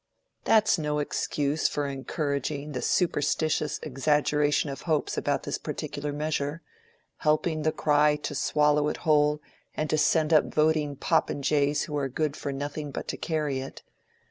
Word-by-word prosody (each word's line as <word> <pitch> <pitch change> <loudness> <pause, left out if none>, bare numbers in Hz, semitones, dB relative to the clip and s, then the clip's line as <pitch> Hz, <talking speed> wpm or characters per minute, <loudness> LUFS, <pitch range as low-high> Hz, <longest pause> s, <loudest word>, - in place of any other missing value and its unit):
"That 220 -1 +4
is 190 - +3
no 150 -1 -1
excuse 145 0 0
for 145 - -2
encouraging 140 +1 -3
the 130 - -3
superstitious 155 -2 0
exaggeration 145 +1 +1
of 135 - -7
hopes 155 -2 +1
about - - -1
this - - -3
particular 145 0 -4
measure, 150 +1 -2 0.5
helping 155 +1 +1
the 155 +1 +1
cry 150 -1 +3
to 150 - -5
swallow 150 +1 +2
it - - -2
whole 150 -1 +3 0.3
and 155 0 -2
to 155 - +2
send 155 +1 +3
up 155 - +4
voting 155 -2 +2
popinjays 145 +1 +1
who 150 - -5
are 135 -2 -1
good 150 +2 -1
for 140 - -4
nothing 145 +2 -4
but - - -6
to - - -2
carry 150 -5 -1
it. 135 +1 -8
150 Hz, 155 wpm, -27 LUFS, 145-155 Hz, 0.5 s, That